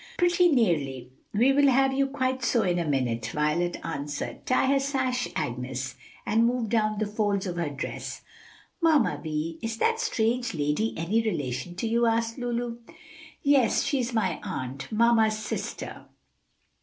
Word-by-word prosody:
"Pretty 355 0 +4
nearly; 145 - +1 0.2
we 245 +6 +4
will 285 0 +5
have 270 0 +4
you 275 0 +2
quite 260 -2 -1
so 235 -1 +2
in 175 -1 +1
a 170 - -1
minute," 120 -5 0
Violet 150 +6 0
answered. 145 -2 -5
"Tie 255 - +3
her 275 +1 +3
sash 260 -3 0
Agnes, 130 -2 -3 0.3
and 215 +2 +1
smooth 235 -1 +1
down 215 -2 +1
the 215 - 0
folds 205 -2 0
of 175 -2 -4
her 170 -3 -1
dress." 145 0 -6 0.6
"Mamma 315 -7 +3
Vi, 160 +1 -3
is 225 0 -3
that 455 - +1
strange 240 - 0
lady 150 +9 0
any 185 +8 +1
relation 150 - -3
to 205 +6 -2
you?" 235 +1 +2
asked 230 +2 0
Lulu. 240 -1 -2 0.7
"Yes, 275 -5 +4
she 280 - 0
is 245 0 -1
my 225 -2 0
aunt, 135 - -5
mamma's 225 -1 +3
sister." 215 - -5
220 Hz, 155 wpm, -27 LUFS, 160-250 Hz, 0.7 s, will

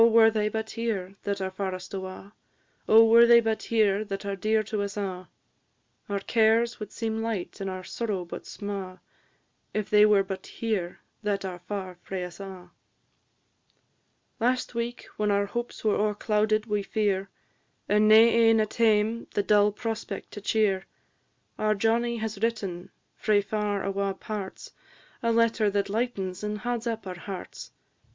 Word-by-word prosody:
Oh, - - +8
were 225 -1 +6
they 215 -1 0
but 220 0 -4
here 205 -5 -3
that 200 -1 -2
are 190 0 -2
farest 185 -1 -5
awa'! 190 +1 -7 0.6
Oh, 225 +1 +8
were 230 +1 +7
they 235 0 +8
but 225 -1 -1
here 215 -3 +2
that 195 0 -5
are 200 0 -2
dear 215 +3 +1
to 210 0 -3
us 200 +1 -4
a'! 185 -3 -4 0.8
Our 200 -1 -1
cares 225 +2 +2
would 210 -2 -7
seem 225 -1 -3
light 220 -3 -4
and 195 - -2
our 185 0 -5
sorrow 205 -4 -3
but 170 - -8
sma', 195 -3 -6 0.8
If 215 -1 -2
they 210 0 +7
were 205 -2 +4
but 190 -1 -6
here 205 -6 -3 0.2
that 205 -2 -1
are 180 -2 -5
far 185 -1 -6
frae 190 -2 -4
us 180 +1 -8
a'! 185 -2 -9 1.7
Last 250 +2 0
week, 235 +1 -3
when 210 0 +1
our 200 0 +2
hopes 240 +4 -5
were 215 -2 +3
o'erclouded 215 +1 +1
wi' 210 -2 0
fear, 195 -1 -1 0.6
And 210 +1 +4
nae 215 - +8
ane 225 -1 +5
at 215 -1 0
hame 225 0 +2
the 205 - +2
dull 210 0 +4
prospect 225 +1 -5
to 205 - -8
cheer; 200 -2 +1 0.7
Our 215 0 +2
Johnnie 235 +3 +1
has 220 -2 -4
written, 200 -6 -2 0.2
frae 215 -2 +2
far 210 -1 -1
awa' 195 0 -1
parts, 200 -2 -6 0.5
A 230 - +1
letter 230 -2 +3
that 200 0 -1
lightens 200 -4 -2
and 210 0 -2
hauds 240 +1 -3
up 225 -2 -3
our 180 -2 -6
hearts. 190 +1 -8
210 Hz, 165 wpm, -27 LUFS, 195-225 Hz, 1.7 s, Oh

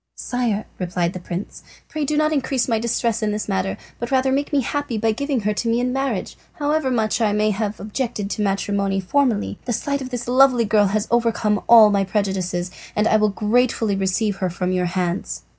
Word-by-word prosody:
"Sire," 235 -4 -2
replied 175 -1 -1
the 185 - -6
prince, 175 +2 -6 0.3
"pray 305 -1 -3
do 295 +2 -1
not 305 0 +2
increase 270 -3 0
my 225 -3 +1
distress 230 0 0
in 215 - 0
this 210 0 -3
matter, 195 -1 -1 0.2
but 235 - -4
rather 265 0 +2
make 280 +2 -1
me 285 -2 +2
happy 285 -2 -2
by 225 +1 +1
giving 275 +2 -1
her 210 +1 0
to 230 - -3
me 230 +1 +2
in 250 0 0
marriage. 270 -7 -2 0.2
However 295 -1 0
much 225 -2 0
I 210 -2 +2
may 210 0 +2
have 210 0 -3
objected 210 -1 -3
to 215 - -2
matrimony 200 0 0
formerly, 225 +2 0
the 240 - -1
sight 280 +4 -2
of 260 - -5
this 245 -2 -5
lovely 255 -1 +4
girl 210 -1 +3
has 210 +2 -1
overcome 230 -3 +1
all 225 -3 +8
my 200 -1 +2
prejudices, 190 -3 -2 0.2
and 210 +1 +2
I 220 - +4
will 215 0 +3
gratefully 220 0 +1
receive 195 +2 0
her 185 - -1
from 180 +1 -2
your 180 -1 0
hands." 180 0 -2
215 Hz, 210 wpm, -21 LUFS, 200-250 Hz, 0.3 s, all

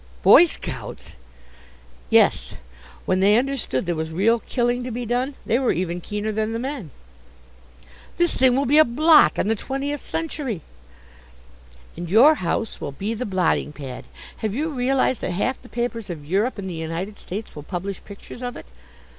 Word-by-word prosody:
"Boy - - +9
scouts!" - - -7 0.9
"Yes; - - +3 0.5
when 185 - +1
they 205 +3 +5
understood 260 - -1
there 175 - 0
was 160 0 -3
real 215 +8 +2
killing 240 +1 -1
to 250 - -4
be 245 +1 -4
done 250 +4 -1
they 235 - +2
were 260 - +2
even 175 -1 -2
keener 210 +3 -3
than 215 +1 -1
the - - -1
men." 255 - -5 1.3
"This 345 -1 +2
thing 255 -1 +4
will 275 +2 +1
be 295 +5 +5
a - - +9
blot 300 - +5
on - - +1
the 220 - +3
Twentieth 275 +5 -4
Century!" 290 - -3 1.3
"And 170 0 -6
your 240 - +7
house 195 +5 -2
will 140 - -4
be 200 +10 -3
the 230 +2 -4
blotting 185 -5 0
pad. 135 -4 -8 0.3
Have 215 -1 -3
you 310 +5 -1
realized 260 -2 +1
that 175 - -2
half 230 +8 -1
the 245 - -15
papers 235 -3 -3
of 155 -4 -6
Europe 200 - 0
and 195 -1 -5
the 185 - -4
United 165 +5 -5
States 210 +5 -7
will 150 - -7
publish 185 +4 -5
pictures 200 +4 -11
of 245 -1 -4
it? - - -10
225 Hz, 175 wpm, -23 LUFS, 185-255 Hz, 1.3 s, Boy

